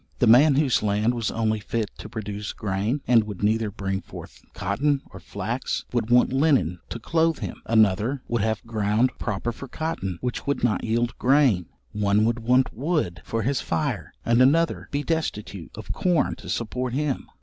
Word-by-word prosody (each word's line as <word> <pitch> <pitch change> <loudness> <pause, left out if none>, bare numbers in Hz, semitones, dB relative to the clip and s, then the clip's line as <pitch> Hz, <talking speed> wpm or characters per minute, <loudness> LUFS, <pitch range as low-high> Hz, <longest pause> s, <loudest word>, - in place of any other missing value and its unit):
The 125 - +3
man 135 +6 +7
whose 140 -3 +2
land 105 +3 +1
was 115 -3 -1
only 110 -1 0
fit 110 +1 -3
to - - -8
produce 105 -3 -5
grain, 105 +7 -2
and 120 -3 +5
would 105 -2 -7
neither 110 +1 +2
bring 95 -1 -3
forth - - -11
cotton 135 +8 0
or - - -10
flax, - - -3
would 110 - 0
want 125 +1 +4
linen 135 - +2
to - - -4
cloath 165 +6 +1
him. - - -6
Another 110 +4 +2
would 120 -2 0
have 110 0 -1
ground 110 +2 +1
proper 110 +2 -2
for 135 +4 -9
cotton, 125 - -3
which 125 +2 -4
would 140 - -1
not 120 -3 +1
yield 120 +1 0
grain. 130 - +3 0.2
One 105 +1 +2
would 120 +1 0
want 125 +3 +2
wood 130 - -1
for 115 -1 -2
his 135 +3 0
fire, 115 - -2
and 115 +1 +4
another 160 +6 +3
be 145 +1 -2
destitute 105 - -3
of - - -5
corn 175 -5 +1
to - - -10
support 125 +2 -2
him. 145 0 -1
115 Hz, 180 wpm, -25 LUFS, 105-135 Hz, 0.2 s, man